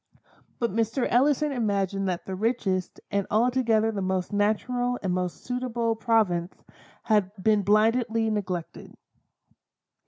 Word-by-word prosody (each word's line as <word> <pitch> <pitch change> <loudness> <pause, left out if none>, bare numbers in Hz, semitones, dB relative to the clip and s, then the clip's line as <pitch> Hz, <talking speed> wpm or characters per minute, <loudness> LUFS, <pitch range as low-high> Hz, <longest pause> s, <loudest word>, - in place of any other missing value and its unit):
But 235 -1 -1
Mr. 230 +4 0
Ellison 285 +4 +2
imagined 200 -5 -1
that 180 -1 -3
the 190 - -5
richest, 195 -3 -1
and 200 -1 0
altogether 225 -1 +2
the 205 -2 -3
most 190 +1 -2
natural 245 +4 0
and 185 -2 0
most 180 -1 -3
suitable 240 -2 -1
province, 210 -6 +1 0.5
had 210 -4 +2
been 210 +2 +3
blindly 225 +2 +2
neglected. 185 -5 -4
215 Hz, 120 wpm, -26 LUFS, 195-235 Hz, 0.5 s, been